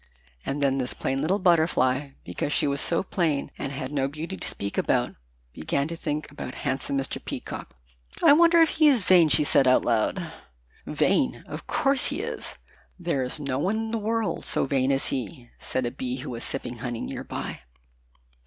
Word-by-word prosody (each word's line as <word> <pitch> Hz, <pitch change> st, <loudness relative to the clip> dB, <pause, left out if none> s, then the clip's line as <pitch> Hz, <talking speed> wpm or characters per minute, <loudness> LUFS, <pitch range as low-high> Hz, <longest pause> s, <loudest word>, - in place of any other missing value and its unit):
And 145 Hz, +1 st, -2 dB
then 135 Hz, -1 st, +2 dB
this 125 Hz, -1 st, -2 dB
plain 135 Hz, +1 st, -1 dB
little 175 Hz, +6 st, +2 dB
Butterfly, 150 Hz, -7 st, +2 dB
because 145 Hz, -, -3 dB
she -, -, +2 dB
was 140 Hz, -1 st, 0 dB
so 170 Hz, -, 0 dB
plain 165 Hz, -7 st, -1 dB
and 140 Hz, -, -3 dB
had 135 Hz, -1 st, -5 dB
no 135 Hz, -2 st, 0 dB
beauty 155 Hz, +6 st, -5 dB
to -, -, -4 dB
speak 100 Hz, 0 st, -4 dB
about, -, -, +1 dB, 0.4 s
began 140 Hz, -, -1 dB
to 170 Hz, -, -4 dB
think 150 Hz, -2 st, -3 dB
about 130 Hz, -3 st, -7 dB
handsome 140 Hz, +1 st, -1 dB
Mr. 135 Hz, 0 st, -3 dB
Peacock. -, -, -6 dB, 0.5 s
"I -, -, +8 dB
wonder 335 Hz, +2 st, +6 dB
if 320 Hz, -, +2 dB
he 315 Hz, -1 st, +4 dB
is 260 Hz, -8 st, +4 dB
vain?" 180 Hz, -4 st, +6 dB
she 150 Hz, -, +5 dB
said 140 Hz, -2 st, +4 dB
out 130 Hz, -, +4 dB
loud. 115 Hz, -3 st, 0 dB, 0.5 s
"Vain! 65 Hz, -, +1 dB
Of -, -, -8 dB
course 275 Hz, 0 st, +1 dB
he -, -, -2 dB
is. -, -, -5 dB, 0.4 s
There 170 Hz, -6 st, 0 dB
is 125 Hz, +4 st, -4 dB
no 140 Hz, -2 st, -2 dB
one 190 Hz, +8 st, +1 dB
in 225 Hz, 0 st, -3 dB
the 230 Hz, -, -1 dB
world 220 Hz, -3 st, -1 dB
so -, -, 0 dB
vain 135 Hz, -1 st, +1 dB
as 135 Hz, 0 st, +2 dB
he," 125 Hz, -1 st, -5 dB
said 130 Hz, -, -2 dB
a 120 Hz, -, -2 dB
Bee, 125 Hz, 0 st, -4 dB
who -, -, -6 dB
was 115 Hz, -1 st, -4 dB
sipping 125 Hz, -3 st, -4 dB
honey 120 Hz, -1 st, -4 dB
near -, -, -5 dB
by. -, -, -5 dB
140 Hz, 195 wpm, -26 LUFS, 130-175 Hz, 0.5 s, I